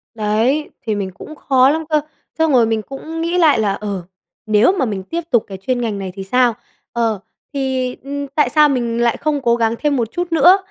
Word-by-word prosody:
Đấy, 225 Hz, +7 st, 0 dB
thì 220 Hz, -2 st, -2 dB
mình 195 Hz, -2 st, -3 dB
cũng 305 Hz, +11 st, -11 dB
khó 265 Hz, -2 st, +3 dB
lắm 320 Hz, +3 st, 0 dB
cơ, 305 Hz, -1 st, +2 dB, 0.4 s
xong 320 Hz, -1 st, +2 dB
rồi 245 Hz, -4 st, +5 dB
mình 220 Hz, -1 st, 0 dB
cũng 310 Hz, +7 st, -7 dB
nghĩ 340 Hz, +2 st, 0 dB
lại 310 Hz, -8 st, +4 dB
là: 205 Hz, -2 st, +1 dB
"Ờ, 200 Hz, -3 st, -4 dB, 0.4 s
nếu 215 Hz, -, +4 dB
mà 340 Hz, -9 st, 0 dB
mình 200 Hz, -4 st, -3 dB
tiếp 330 Hz, -, -3 dB
tục 235 Hz, -3 st, +4 dB
cái 195 Hz, -, -7 dB
chuyên 245 Hz, +6 st, -2 dB
ngành 215 Hz, -4 st, -2 dB
này 190 Hz, -1 st, -5 dB
thì 195 Hz, -, -6 dB
sao? 245 Hz, +4 st, +2 dB, 0.4 s
Ờ, 225 Hz, -3 st, 0 dB, 0.3 s
thì, 260 Hz, -2 st, -1 dB
ừm, 285 Hz, +1 st, -4 dB
tại 290 Hz, +2 st, +1 dB
sao 300 Hz, -1 st, +5 dB
mình 235 Hz, -3 st, -1 dB
lại 235 Hz, -1 st, +2 dB
không 295 Hz, -2 st, -1 dB
cố 235 Hz, -2 st, +3 dB
gắng 230 Hz, -1 st, +1 dB
thêm 295 Hz, -2 st, +1 dB
một 230 Hz, -4 st, -1 dB
chút 350 Hz, -1 st, -3 dB
nữa?" 350 Hz, +4 st, +6 dB
250 Hz, 225 wpm, -18 LUFS, 220-295 Hz, 0.4 s, nữa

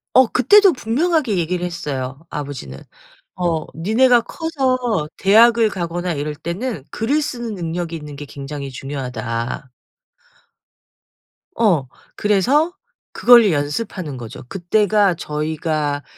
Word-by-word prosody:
어 260 Hz, -2 st, +7 dB
그때도 395 Hz, -, +5 dB
분명하게 260 Hz, -, 0 dB
얘기를 175 Hz, +2 st, -1 dB
했어요, 140 Hz, -6 st, -4 dB
아버지는. 130 Hz, -, -6 dB, 0.6 s
어 170 Hz, -3 st, -1 dB
"니네가 235 Hz, +8 st, +4 dB
커서 255 Hz, -, -1 dB
대학을 225 Hz, +3 st, +5 dB
가거나 175 Hz, -1 st, -3 dB
이럴 150 Hz, +1 st, -3 dB
때는 180 Hz, -, -4 dB
글을 270 Hz, +8 st, 0 dB
쓰는 240 Hz, -7 st, -4 dB
능력이 170 Hz, -1 st, -4 dB
있는 150 Hz, -2 st, -8 dB
게 145 Hz, +1 st, -8 dB
굉장히 140 Hz, 0 st, -7 dB
중요하다." 125 Hz, -2 st, -5 dB, 1.8 s
어. 175 Hz, -, +2 dB, 0.3 s
그래서 260 Hz, -, +2 dB, 0.4 s
그걸로 235 Hz, -5 st, +6 dB
연습하는 150 Hz, -, -3 dB
거죠. 115 Hz, -1 st, -9 dB
그때가 200 Hz, +1 st, +2 dB
저희가 150 Hz, -2 st, -2 dB
175 Hz, 260 characters per minute, -20 LUFS, 145-230 Hz, 1.8 s, 어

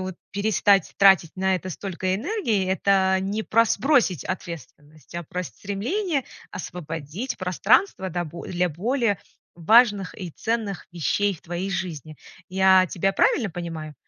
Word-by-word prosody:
вот 185 Hz, -1 st, -5 dB, 0.2 s
перестать 200 Hz, -2 st, +2 dB
тратить 190 Hz, -4 st, +5 dB
на 190 Hz, 0 st, +1 dB
это 185 Hz, +1 st, -4 dB
столько 185 Hz, +1 st, -3 dB
энергии- 230 Hz, -, -1 dB
это 190 Hz, 0 st, +2 dB
не 205 Hz, +3 st, -2 dB
про 230 Hz, +1 st, +3 dB
сбросить 245 Hz, -, +2 dB
ответственность, 155 Hz, -4 st, -8 dB
а 175 Hz, -, -3 dB
про 180 Hz, +3 st, -5 dB
стремление 270 Hz, -, -2 dB, 0.3 s
освободить 165 Hz, -, -6 dB
пространство 190 Hz, -, +2 dB
да 175 Hz, +1 st, -2 dB
бо 165 Hz, +2 st, -9 dB
для 180 Hz, 0 st, 0 dB
более 215 Hz, -, 0 dB, 0.4 s
важных 205 Hz, +2 st, +4 dB
и 180 Hz, -2 st, -5 dB
ценных 220 Hz, 0 st, -3 dB
вещей 195 Hz, +4 st, 0 dB
в -, -, -17 dB
твоей 175 Hz, +3 st, -4 dB
жизни. 160 Hz, -5 st, -5 dB, 0.3 s
Я 190 Hz, 0 st, +5 dB
тебя 195 Hz, +2 st, 0 dB
правильно 245 Hz, -, +2 dB
понимаю? 165 Hz, -3 st, -6 dB
190 Hz, 135 wpm, -24 LUFS, 175-205 Hz, 0.4 s, тратить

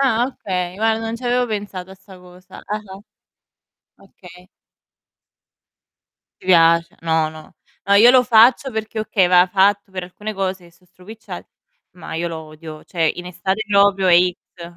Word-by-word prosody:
Ah 245 Hz, -3 st, +2 dB
okay, 180 Hz, -7 st, -5 dB
guarda 220 Hz, +1 st, +1 dB
non 225 Hz, 0 st, -4 dB
ci 250 Hz, -, -12 dB
avevo 245 Hz, 0 st, +1 dB
pensato 200 Hz, -4 st, -6 dB
a -, -, -11 dB
'sta 190 Hz, 0 st, -17 dB
cosa. 180 Hz, 0 st, -15 dB
Ah-ah. 205 Hz, -2 st, -6 dB, 1.0 s
Okay. 180 Hz, -2 st, -17 dB, 1.9 s
Ti -, -, -19 dB
piace 170 Hz, -1 st, +3 dB
no, 160 Hz, -1 st, 0 dB
no. 155 Hz, 0 st, -13 dB, 0.3 s
No, 200 Hz, -, +3 dB
io 230 Hz, +4 st, +7 dB
lo 255 Hz, -1 st, +5 dB
faccio 245 Hz, +3 st, +4 dB
perché, 220 Hz, 0 st, -5 dB
okay, 195 Hz, -4 st, +1 dB
va 180 Hz, 0 st, +5 dB
fatt' 200 Hz, +1 st, +1 dB
per 185 Hz, -1 st, -6 dB
alcune 205 Hz, +4 st, -7 dB
cose 190 Hz, -2 st, -4 dB
che 170 Hz, -, -18 dB
so' 180 Hz, +2 st, -28 dB
stropicciate, 185 Hz, +5 st, -11 dB, 0.5 s
ma 175 Hz, -, -9 dB
io 170 Hz, +1 st, -2 dB
lo 165 Hz, -1 st, -6 dB
odio. 155 Hz, 0 st, -11 dB
Cioè 165 Hz, -3 st, -1 dB
in 180 Hz, 0 st, -8 dB
estate 190 Hz, +4 st, -3 dB
proprio 200 Hz, -1 st, +3 dB
è 175 Hz, -1 st, +6 dB
X. 180 Hz, 0 st, -1 dB
190 Hz, 165 wpm, -19 LUFS, 175-215 Hz, 1.9 s, io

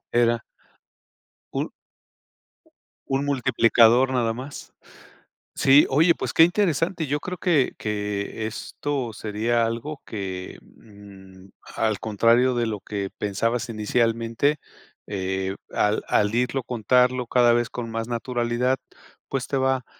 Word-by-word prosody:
Era 120 Hz, -1 st, +2 dB, 1.1 s
Ul -, -, -2 dB, 1.4 s
Un 135 Hz, +1 st, -1 dB
multiplicador 120 Hz, -2 st, +4 dB
nada 120 Hz, -3 st, +1 dB
más. 130 Hz, +5 st, -9 dB, 0.8 s
Sí, 140 Hz, +2 st, +5 dB
oye, 160 Hz, +5 st, +4 dB
pues -, -, -4 dB
qué 160 Hz, -, +7 dB
interesante. 170 Hz, -2 st, +1 dB
Yo 145 Hz, +2 st, -1 dB
creo 180 Hz, +3 st, -6 dB
que 155 Hz, -6 st, +2 dB
que 105 Hz, 0 st, -3 dB
esto 125 Hz, +2 st, -4 dB
sería 110 Hz, +3 st, 0 dB
algo 115 Hz, +6 st, -4 dB
que, 95 Hz, -3 st, -6 dB
mm, 95 Hz, -2 st, -16 dB, 0.3 s
al 110 Hz, -3 st, 0 dB
contrario 115 Hz, +4 st, +3 dB
de 120 Hz, -1 st, +1 dB
lo 110 Hz, -2 st, -3 dB
que 100 Hz, 0 st, -4 dB
pensabas 115 Hz, +5 st, -1 dB
inicialmente, 115 Hz, +5 st, 0 dB, 0.5 s
eh, 95 Hz, -1 st, -2 dB, 0.2 s
al 105 Hz, +1 st, +1 dB
al 105 Hz, 0 st, +2 dB
irlo 125 Hz, +2 st, 0 dB
contarlo 125 Hz, +1 st, +1 dB
cada 120 Hz, -1 st, +4 dB
vez 120 Hz, 0 st, +1 dB
con 120 Hz, -2 st, -6 dB
más 115 Hz, 0 st, -3 dB
naturalidad, 120 Hz, +1 st, -1 dB, 0.5 s
pues 135 Hz, -2 st, -2 dB
te 140 Hz, -, -1 dB
va 130 Hz, -1 st, +1 dB
120 Hz, 120 wpm, -24 LUFS, 105-130 Hz, 1.4 s, qué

